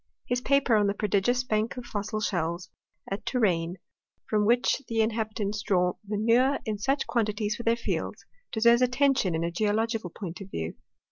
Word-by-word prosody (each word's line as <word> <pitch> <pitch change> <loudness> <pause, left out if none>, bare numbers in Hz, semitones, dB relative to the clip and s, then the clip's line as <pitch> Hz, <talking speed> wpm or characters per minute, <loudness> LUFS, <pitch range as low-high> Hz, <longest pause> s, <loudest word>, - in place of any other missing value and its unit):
His 245 0 -1
paper 275 -3 +3
on 205 -1 +3
the 200 - 0
prodigious 210 +5 +1
bank 220 0 -1
of 250 - -6
fossil 215 0 -3
shells 175 -3 -2 0.4
at 195 - -3
Touraine, 180 -8 0 0.5
from 210 -1 +1
which 245 +3 +3
the 225 -1 -1
inhabitants 215 -2 -1
draw 180 -3 +2
manure 230 +6 +2
in 215 -2 -2
such 270 +6 0
quantities 215 -2 0
for - - -6
their 230 0 +2
fields, 235 - -4 0.3
deserves 235 +2 +4
attention 250 - +2
in 160 - -1
a 170 - -1
geological 220 +1 0
point 180 +1 -7
of 195 - -8
view. 80 - -4
215 Hz, 165 wpm, -27 LUFS, 200-235 Hz, 0.5 s, deserves